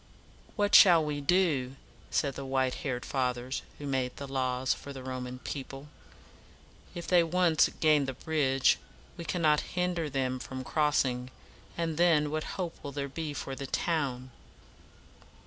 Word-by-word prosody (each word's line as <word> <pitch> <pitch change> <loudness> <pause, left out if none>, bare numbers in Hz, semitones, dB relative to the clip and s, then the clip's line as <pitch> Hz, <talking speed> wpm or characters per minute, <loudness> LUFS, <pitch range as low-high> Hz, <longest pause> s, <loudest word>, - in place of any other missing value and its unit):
"What 205 -2 0
shall 170 -5 +8
we 145 -1 -3
do?" 140 -6 +2 0.3
said 140 -1 0
the 140 - -6
white 130 -1 0
haired 125 -4 -3
Fathers 125 -1 -2 0.2
who 145 - -8
made 130 -2 -1
the 140 - -6
laws 130 -1 0
for 140 - -9
the 135 -2 -8
Roman 125 -1 -5
people. 135 +2 -7 1.1
"If 170 -1 -5
they 180 -2 +5
once 170 -1 +3
gain 150 -3 +4
the 135 - -3
bridge, 135 -1 +2 0.4
we 170 - -7
cannot 155 -2 +2 0.2
hinder 175 -3 0
them 130 -2 -1
from 130 0 -6
crossing; 130 -4 +1 0.5
and 165 -2 -2
then 160 -4 +3
what 155 0 -4
hope 180 -3 -3
will 140 - -5
there 140 0 -3
be 155 +2 -4
for 135 - -5
the 135 0 -6
town?" 130 -6 -1
140 Hz, 150 wpm, -30 LUFS, 130-160 Hz, 1.1 s, shall